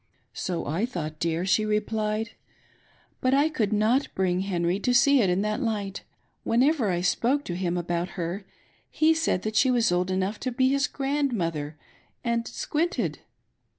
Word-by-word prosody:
" - - -43
So 175 -3 -3
I 175 +10 -1
thought, 155 -9 -5
dear," 170 +1 0
she 205 +3 +3
replied; 215 +1 -1 0.5
" - - -35
but 255 +1 +3
I 290 +3 +3
could 230 -10 -1
not 220 +6 +2
bring 180 -1 +1
Henry 180 -1 0
to 245 +4 +1
see 275 +2 +5
it 195 - +2
in 180 +3 +1
that 215 +5 -1
light. 205 -5 -2 0.4
Whenever 250 -1 +2
I 175 -1 0
spoke 245 +10 +1
to 175 - -4
him 180 -1 -1
about 175 +1 -3
her 175 +3 -3 0.5
he 315 +1 +3
said 215 - -1
she 260 - +4
was 240 -5 +3
old 180 +1 +1
enough 190 +3 -1
to 255 - -2
be 260 +2 +2
his 275 0 +2
grand 280 -1 -1
i - - 0
mother, 155 -5 -3 0.5
and 235 -1 0
squinted. 340 +6 -2
215 Hz, 180 wpm, -26 LUFS, 180-255 Hz, 0.5 s, see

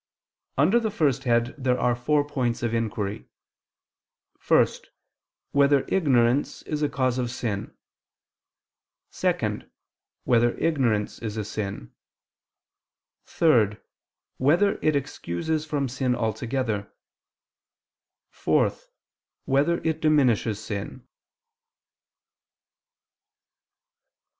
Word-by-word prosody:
Under 175 - +4
the 225 -2 -1
first 140 - 0
head, 120 0 +2
there 125 -1 +1
are 120 -1 +2
four 145 +4 +1
points 125 -5 -2
of 115 -1 -1
inquiry: 105 -3 -3 1.2
(1) - - +6 0.9
Whether 140 -1 +3
ignorance 130 -6 +2
is 150 -1 -3
a 150 - +1
cause 130 -2 0
of 120 -1 -1
sin? 110 -4 -4 1.3
(2) - - -1 0.5
Whether 120 -1 +2
ignorance 125 -10 0
is 110 -2 -5
a 105 - -2
sin? 100 - -5 1.3
(3) 115 - +3 0.6
Whether 175 +10 +3
it 155 -1 +2
excuses 145 - -3
from 145 -3 -1
sin 125 0 -1
altogether? 115 -1 -2 1.4
(4) - - +1 0.7
Whether 145 +6 +2
it 160 -1 -1
diminishes 125 -8 +2
sin? 105 -2 -6
125 Hz, 90 wpm, -25 LUFS, 115-145 Hz, 1.4 s, 1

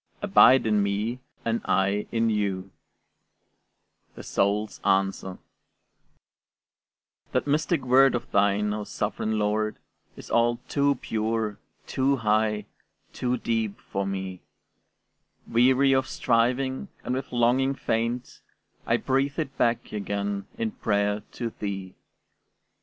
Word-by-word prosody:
ABIDE 135 - +6
IN 105 -2 +3
ME, 105 +5 -1 0.3
AND 115 0 0
I 100 +2 +1
IN 115 -1 +1
YOU 100 -3 -1 1.4
THE - - -9
SOUL'S 105 +2 0
ANSWER 95 -1 0 2.0
That - - +1
mystic 150 0 0
word 130 +1 +5
of 120 - -5
thine, 100 +1 +2
O 105 0 -3
sovereign 110 +1 -2
Lord, 105 +1 0 0.4
Is - - -11
all 120 0 +3
too 140 0 +2
pure, 110 -1 -2 0.3
too 135 +1 +1
high, 110 -2 +1 0.5
too 125 0 -1
deep 115 -3 -2
for 100 0 -3
me; 95 -2 -4 1.1
Weary 130 +3 +4
of 130 0 +2
striving, 130 - 0 0.2
and - - -2
with 130 +1 -4
longing 125 +3 +2
faint, 115 +1 -2 0.5
I - - +3
breathe 135 +2 0
it 150 -4 -3
back 115 0 0
again 100 -1 -3
in 115 -1 -1
prayer 105 0 0
to 120 -2 -4
thee. 95 -2 -4
110 Hz, 115 wpm, -26 LUFS, 100-130 Hz, 2.0 s, ABIDE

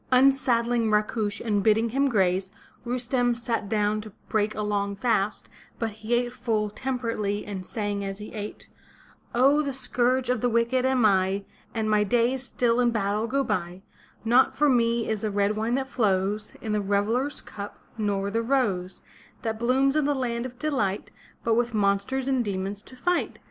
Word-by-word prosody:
Unsaddling 245 -3 +3
Rakush 210 0 0
and 210 -3 +1
bidding 220 +3 +3
him 275 +4 +2
graze, 190 -4 +1 0.4
Rustem 245 0 +1
sat 230 -4 -2
down 210 0 +1
to 215 - -9 0.2
break 215 0 +1
a 215 - -2
long 200 -1 -1
fast, 210 -2 0 0.3
but 225 -1 -2
he 220 +3 -2
ate 240 0 0
full 215 -3 -1
temperately 230 -4 -2
and 200 -3 -5
sang 205 0 -3
as 195 0 -4
he 210 +1 -9
ate: 210 -1 -7 0.7
*'0h, 275 +5 +5
the 280 -2 -2
scourge 255 -1 +1
of 250 - -1
the 245 - +2
wicked 235 +3 +2
am 260 -3 +3
I; 195 0 +2 0.3
And 220 -1 0
my 210 -1 +3
days 240 +4 +1
still 245 -2 +1
in 245 -1 +4
battle 210 0 0
go 275 +3 +1
by; 185 -5 -3 0.4
Not 245 +3 +4
for 295 - +3
me 235 -2 +2
is 220 -2 -1
the 215 - -1
red 205 +1 +1
wine 225 +3 0
that 265 0 -1
flows 210 -3 0
In 220 - -3
the 210 0 +1
reveller's 210 +8 0
cup, 205 0 -8 0.2
nor 200 -2 -1
the 225 +2 +1
rose 210 -8 0 0.4
That 220 -1 -2
blooms 265 +4 +2
in 305 -2 +2
the 290 0 +1
land 240 -2 -2
of 250 -1 -14
delighty 245 -9 -1 0.3
But 230 - +2
with 235 0 +1
monsters 210 +6 +1
and 260 -2 +2
demons 200 0 -3
to 255 - -14
fight! 355 +8 0
225 Hz, 180 wpm, -26 LUFS, 205-250 Hz, 0.7 s, 0h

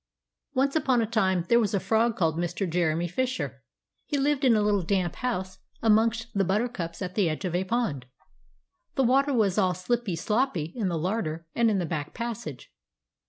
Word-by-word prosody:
Once 275 +2 +2
upon 270 -6 +2
a 230 - +2
time 190 -6 +1
there 235 - +5
was 210 -3 +1
a - - +2
frog 225 +3 +1
called 160 -3 +1
Mr. 175 +3 -2
Jeremy 170 0 0
Fisher; 255 +8 -2 0.5
he 290 - -1
lived 280 0 +1
in 250 -4 +5
a 215 - +3
little 205 -1 +2
damp 180 -1 -1
house 190 -7 -3 0.2
amongst 225 +1 +2
the 200 -2 +2
buttercups 190 -3 -2
at 180 0 -5
the 190 -4 +2
edge 155 +5 -3
of 180 - -2
a 180 +1 +1
pond. 190 - -1 0.9
The 270 - +2
water 270 +3 +3
was 215 -6 +2
all 185 -2 +2
slippy 200 +1 -1
sloppy 185 - -1
in 220 -6 -1
the 170 -2 -1
larder 165 -2 -2
and 235 -1 +3
in 210 - +1
the 180 - 0
back 150 -3 -4
passage. 225 - -6
205 Hz, 190 wpm, -27 LUFS, 175-235 Hz, 0.9 s, there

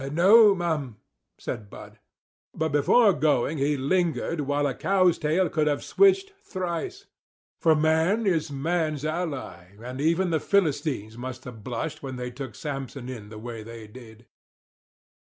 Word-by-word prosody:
"No, 200 +5 +7
m'm," 155 - -2 0.4
said 105 -2 -6
Bud. - - -12 0.6
But 160 0 -1
before 200 +9 +4
going 150 -1 +1
he 145 +1 +1
lingered 165 +2 0
while 145 +1 0
a 140 - 0
cow's 185 +2 +2
tail 165 +5 +1
could 155 -2 0
have 145 -1 0
switched 390 0 +3
thrice; 185 - -4 0.5
for 160 -2 +4
man 160 +8 +2
is 165 -5 +1
man's 155 0 -1
ally; 140 - -4
and 125 +3 -6
even 170 +4 +2
the 160 - +2
Philistines 145 - 0
must 130 0 -6
have 115 -4 -10
blushed 150 +7 -4
when 135 -2 -6
they 125 0 -5
took 125 -3 -8
Samson 135 -3 -6
in 110 -5 -8
the 110 - -10
way 115 0 -7
they 115 0 -10
did. 110 0 -14
150 Hz, 150 wpm, -26 LUFS, 125-175 Hz, 0.6 s, No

